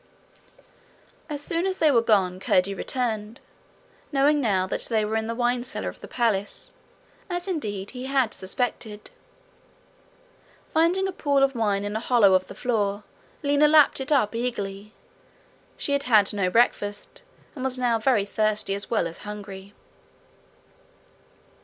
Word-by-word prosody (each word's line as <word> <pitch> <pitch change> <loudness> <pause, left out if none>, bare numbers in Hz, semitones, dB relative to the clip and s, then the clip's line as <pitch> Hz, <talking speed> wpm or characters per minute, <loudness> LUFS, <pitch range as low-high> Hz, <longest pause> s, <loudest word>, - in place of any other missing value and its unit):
As 290 -1 -4
soon 335 +4 0
as 380 0 -2
they 310 -2 +4
were 235 -4 +4
gone, 190 -5 +2
Curdie 190 +1 +2
returned, 225 +1 -3 0.7
knowing 290 +1 +3
now 195 -6 +1
that 190 - -3
they 220 -2 +1
were 215 +1 -2
in 220 0 -1
the 230 - -3
wine 245 0 0
cellar 250 - -5
of - - -12
the - - -9
palace, 215 -5 -1 0.6
as 355 +1 -3
indeed, 205 - -4
he 255 0 -7
had 265 -4 +1
suspected. 215 - -3 1.6
Finding 345 +4 +2
a - - -3
pool 285 -6 +1
of 270 0 +2
wine 205 -4 0
in 205 +1 -4
a - - 0
hollow 230 -5 +4
of 185 0 +2
the - - -10
floor, 210 -4 -1 0.4
Lina 285 +1 +4
lapped 300 -2 +5
it 265 +3 -3
up 245 -8 +3
eagerly: 210 -4 -4 0.9
she - - -3
had 280 - +1
had 210 -4 +5
no 195 -3 0
breakfast, 205 - 0 0.3
and 260 - -7
was 260 -1 0
now 240 -2 +1
very 220 -3 +2
thirsty 215 -1 0
as 200 0 -4
well 220 -6 +1
as 165 - -10
hungry. 200 -2 -9
230 Hz, 155 wpm, -25 LUFS, 205-270 Hz, 1.6 s, lapped